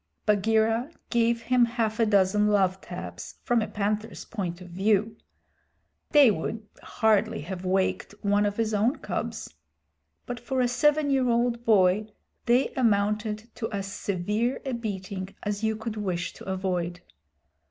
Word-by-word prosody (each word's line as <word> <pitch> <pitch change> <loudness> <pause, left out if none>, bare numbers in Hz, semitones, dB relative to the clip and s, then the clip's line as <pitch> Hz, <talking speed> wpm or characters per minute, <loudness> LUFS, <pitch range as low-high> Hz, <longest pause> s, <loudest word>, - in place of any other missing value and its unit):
Bagheera 220 +4 +2 0.2
gave 235 0 +2
him 250 +1 +3
half 230 -2 -2
a 225 - +4
dozen 205 0 +3
love 190 -2 +2
taps - - -8
from 240 -2 +2
a 215 - -2
panther's 210 -3 -3
point 185 -6 -4
of 180 -1 -11
view 210 +4 +1 0.9
(they 285 -7 +7
would 210 +4 -4
hardly 220 -2 +1
have 185 +3 -6
waked 190 +2 0
one 205 0 +3
of 205 - -4
his 225 -1 0
own 220 +7 +2
cubs), - - -4 0.7
but 245 -1 -5
for 260 +2 -2
a 250 - +3
seven 290 +4 +2
year 260 -2 +2
old 235 0 +1
boy 205 -1 +4 0.4
they 245 +3 +4
amounted 215 -1 0
to 225 - -4
as 200 -2 -3
severe 210 +6 -1
a 265 - -2
beating 195 -4 -5
as 205 +1 -3
you 220 0 +1
could 220 0 -5
wish 185 -4 -2
to - - -12
avoid. 180 -2 -2
215 Hz, 150 wpm, -27 LUFS, 195-235 Hz, 0.9 s, they